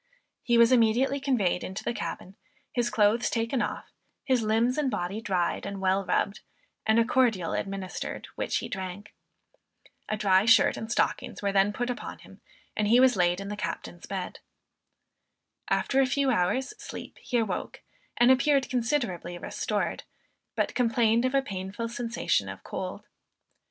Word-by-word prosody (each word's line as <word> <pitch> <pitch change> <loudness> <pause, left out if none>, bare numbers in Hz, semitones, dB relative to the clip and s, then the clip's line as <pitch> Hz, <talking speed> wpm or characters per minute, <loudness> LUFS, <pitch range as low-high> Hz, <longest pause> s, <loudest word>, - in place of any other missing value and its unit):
He 240 -1 +2
was 235 +1 +6
immediately 250 +3 +3
conveyed 240 -11 +1
into 190 - -5
the - - -1
cabin, 190 -4 -6 0.4
his 240 -1 0
clothes 210 +2 +3
taken 230 +2 0
off, 210 - -4 0.3
his 260 -3 +2
limbs 225 +3 +2
and 285 -3 +1
body 205 -1 -3
dried 185 -5 -1
and 200 -1 -5
well 190 +1 +1
rubbed, 200 +1 0 0.5
and 220 +1 +4
a 230 - +4
cordial 230 -9 +2
administered 195 -2 -4
which - - -1
he - - -4
drank. 190 +1 -6 1.0
A 215 - -1
dry 195 -1 +4
shirt 230 0 +5
and 220 +1 -6
stockings 235 - -1
were 200 - +1
then 195 +1 +3
put 245 +4 -2
upon 245 - -6
him, - - -16 0.3
and 210 - +1
he 235 +4 +6
was 255 -2 +5
laid 175 -1 +2
in 200 0 -6
the 210 - -3
captain's 175 -3 -5
bed. 190 -2 -5 1.3
After 270 0 +2
a 265 - +3
few 275 +1 +1
hours 250 +6 0
sleep - - -9
he 245 - -2
awoke, 215 -6 -2 0.4
and 240 +2 +6
appeared 275 +1 +3
considerably 230 - -1
restored, - - -2 0.5
but - - 0
complained 235 -1 +2
of 255 +1 0
a 275 - +3
painful 195 +1 -4
sensation 235 0 -1
of - - -9
cold. - - -6
225 Hz, 160 wpm, -28 LUFS, 195-245 Hz, 1.3 s, was